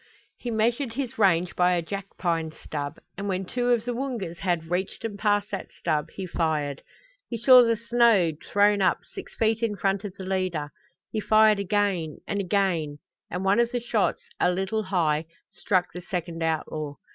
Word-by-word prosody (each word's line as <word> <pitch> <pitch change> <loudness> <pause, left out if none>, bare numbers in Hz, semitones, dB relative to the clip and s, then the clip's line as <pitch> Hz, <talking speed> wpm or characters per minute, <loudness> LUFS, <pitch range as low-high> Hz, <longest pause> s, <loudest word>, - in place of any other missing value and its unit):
He 245 - -6
measured 230 +3 0
his 255 -3 -4
range 180 -3 +3
by 180 0 +3
a 175 - +1
jackpine 170 -4 -3
stub, 145 -2 -5 0.2
and 200 - -3
when 190 -1 -1
two 245 +5 -1
of 235 -2 +2
the 245 - -1
Woongas 235 -10 -4
had 170 -3 -1
reached 190 +5 -2
and 205 -3 -5
passed 205 0 +1
that 195 -2 -5
stub 155 -3 -1
he 190 - -4
fired. 155 -5 -1 0.5
He 235 - -3
saw 250 +2 +8
the 230 -1 +2
snow 230 -6 +4 0.2
thrown 205 0 +4
up 185 - +2
six - - -10
feet 225 0 +1
in 225 -3 0
front 195 0 0
of 200 -2 -6
the 190 - -7
leader. 185 -6 -2 0.4
He 220 - -1
fired 215 -1 +5
again, 195 -5 0
and 200 - -1
again, 180 -6 0 0.3
and 180 +2 -3
one 195 +3 +4
of 235 0 +2
the 245 - 0
shots, 230 -3 0 0.2
a - - +4
little 195 +4 -1
high, 165 -6 0 0.3
struck 185 -5 0
the 180 - -6
second 175 -3 -4
outlaw. 155 -2 -2
195 Hz, 180 wpm, -26 LUFS, 170-220 Hz, 0.5 s, saw